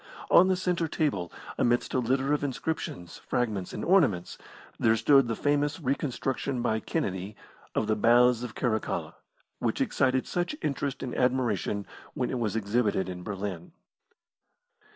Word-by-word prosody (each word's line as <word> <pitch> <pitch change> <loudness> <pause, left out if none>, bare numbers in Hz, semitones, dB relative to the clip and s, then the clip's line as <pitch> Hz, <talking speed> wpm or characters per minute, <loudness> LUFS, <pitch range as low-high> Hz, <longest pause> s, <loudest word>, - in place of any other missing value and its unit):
On 180 - +7
the 190 - +3
centre 180 -2 0
table, 135 - -1 0.3
amidst 120 0 +1
a 130 - +2
litter 130 +4 +1
of 150 - 0
inscriptions, 130 - -4
fragments, 110 -7 -2
and - - -4
ornaments, 140 - +2 0.4
there 110 0 +4
stood 135 +3 +5
the 115 - -1
famous 145 +4 0
reconstruction 135 -2 -2
by 110 0 +1
Kennedy 100 - -3 0.4
of - - +1
the 110 0 +1
Baths 120 +2 +4
of 125 -2 -6
Caracalla, 110 -4 -1 0.5
which - - -1
excited 130 0 +1
such 175 +11 -2
interest 140 -1 -2
and 125 - -4
admiration 120 -5 0 0.3
when 125 - -1
it 130 - -2
was 110 -3 -1
exhibited 105 -3 0
in 90 -1 -6
Berlin. 95 -3 -5
125 Hz, 145 wpm, -28 LUFS, 105-140 Hz, 0.5 s, On